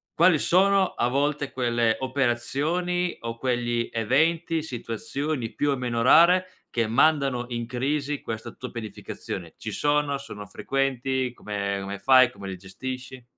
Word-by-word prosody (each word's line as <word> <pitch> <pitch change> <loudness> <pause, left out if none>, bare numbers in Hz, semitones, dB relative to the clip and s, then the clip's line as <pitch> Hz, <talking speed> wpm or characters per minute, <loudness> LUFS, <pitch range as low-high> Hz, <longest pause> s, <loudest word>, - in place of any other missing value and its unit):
quali 170 -1 +5
sono 195 +3 +4
a 120 - +1
volte 145 +1 0
quelle 120 -2 +1
operazioni, 140 +8 0
o 115 0 -5
quegli 120 -2 0
eventi, 160 +8 +1
situazioni 130 0 -4
più 145 - 0
o 140 - +1
meno 120 -2 -1
rare, 175 +8 +6 0.2
che 115 -2 0
mandano 135 0 +2
in 120 -1 -3
crisi 140 +4 -1
questa 110 -1 -5
tua 125 - -8
pianificazione. 110 -4 -7
Ci - - -6
sono? 145 -1 +1
Sono 105 -7 -9
frequenti? 130 +2 -1
Come 100 -3 -3
come 100 0 -5
fai? 130 0 +6
Come 100 -5 -9
li 95 - -5
gestisci? 130 +7 -7
130 Hz, 140 wpm, -25 LUFS, 115-150 Hz, 0.2 s, rare